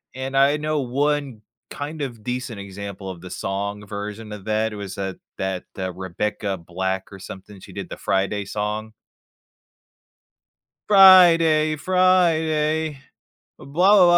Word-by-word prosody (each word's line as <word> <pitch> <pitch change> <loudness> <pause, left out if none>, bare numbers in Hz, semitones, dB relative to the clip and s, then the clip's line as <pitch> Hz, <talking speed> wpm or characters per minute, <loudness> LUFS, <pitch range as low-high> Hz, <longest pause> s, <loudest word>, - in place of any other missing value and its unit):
and 135 +1 -4
I 140 +2 +5
know 150 -1 -1
one 140 -1 -1 0.3
kind 150 +1 -6
of 120 -6 -5
decent 125 -3 -4
example 100 0 -7
of 90 -2 -8
the 90 - -9
song 100 +2 -4
version 105 +1 -6
of 105 -1 -8
that 110 0 0
was, 100 -2 -7
uh, 95 -1 -3 0.2
that, 95 -1 -3
uh, 95 -1 -2
Rebecca 95 +2 -3
Black 95 +3 -4
or 95 - -10
something, 95 +1 -10
she - - -13
did - - -6
the, - - -7
"Friday" 100 +1 -1
song. 105 +2 -3 1.9
Friday. 170 -6 +7
Friday. 160 -4 +2 0.6
Blah, - - -13
blah, 185 +7 +5
110 Hz, 130 wpm, -23 LUFS, 100-155 Hz, 1.9 s, Friday